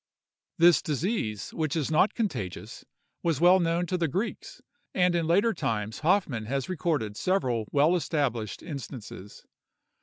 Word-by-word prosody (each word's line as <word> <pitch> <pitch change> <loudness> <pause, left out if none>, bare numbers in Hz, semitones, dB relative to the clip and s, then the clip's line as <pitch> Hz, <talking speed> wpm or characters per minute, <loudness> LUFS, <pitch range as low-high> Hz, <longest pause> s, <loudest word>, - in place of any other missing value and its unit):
This 170 0 +6
disease, 150 - -2
which 155 -2 -2
is 160 -2 -1
not 160 +7 +3
contagious, 160 - -4 0.4
was 165 -5 0
well 180 +3 +6
known 170 0 +1
to 180 +1 -2
the 165 - +1
Greeks; 190 - -4 0.4
and 180 -1 +3
in 170 -2 0
later 200 +7 +3
times 110 - -3
Hoffmann 155 - +1
has 135 +3 -2
recorded 155 - -1
several 125 - 0
well 150 +5 +4
established 135 - -2
instances. 125 - -8
160 Hz, 140 wpm, -27 LUFS, 120-180 Hz, 0.4 s, This